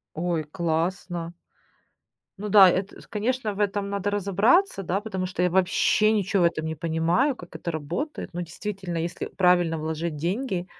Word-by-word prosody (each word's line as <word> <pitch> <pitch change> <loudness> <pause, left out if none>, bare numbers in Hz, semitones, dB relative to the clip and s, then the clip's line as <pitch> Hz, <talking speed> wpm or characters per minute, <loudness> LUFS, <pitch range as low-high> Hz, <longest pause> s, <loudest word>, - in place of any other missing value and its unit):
Ой, 165 -1 -1
классно. 170 +2 -2 1.0
Ну 210 +2 -4
да, 195 -2 +8
это, 185 +2 -2
с - - -14
конечно, 225 0 -2
в 200 - -7
этом 200 -1 0
надо 200 0 -1
разобраться, 205 - +2
да? 190 +2 -1
Потому 190 -4 -3
что 180 -1 -3
я 180 - +3
вообще 190 +3 +3
ничего 200 -3 +1
в - - +6
этом 160 -2 -1
не 160 - -2
понимаю, 165 - +1
как 175 -5 -12
это 170 - -4
работает. 170 - -4
Но 175 - -4
действительно, 180 +1 -5
если 170 +1 -3
правильно 175 -3 +2
вложить 160 +1 -3
деньги, 180 - -2
180 Hz, 165 wpm, -25 LUFS, 170-205 Hz, 1.0 s, да